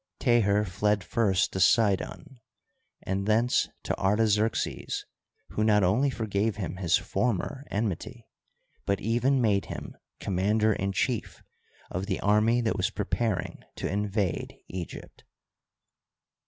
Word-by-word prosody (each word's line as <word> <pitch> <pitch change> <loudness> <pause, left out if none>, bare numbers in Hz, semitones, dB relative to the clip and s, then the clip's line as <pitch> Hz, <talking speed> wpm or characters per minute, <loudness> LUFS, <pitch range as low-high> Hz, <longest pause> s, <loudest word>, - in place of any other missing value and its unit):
Teher 105 -3 +3
fled 105 +2 0
first 95 -2 +1
to 95 - -2
Sidon 110 - +2 0.6
and 95 +1 -2
thence 115 +3 +2
to - - -1
Artaxerxes, 105 +2 +1 0.4
who 105 - -1
not 105 -2 +4
only 115 +10 +3
forgave 110 -3 -1
him 95 -3 -4
his 90 -2 +3
former 125 +4 -2
enmity, 110 +3 -3 0.6
but 100 -1 +1
even 120 +5 +2
made 105 -5 +2
him - - -7 0.2
commander 105 +4 +1
in 95 0 -2
chief 115 +3 -2 0.5
of 95 +3 -3
the 95 - -1
army 105 +4 +3
that 110 -2 0
was 95 - +1
preparing 105 +1 -2
to - - -3
invade 100 -3 -1
Egypt. 90 -2 -8
105 Hz, 120 wpm, -28 LUFS, 95-115 Hz, 0.6 s, not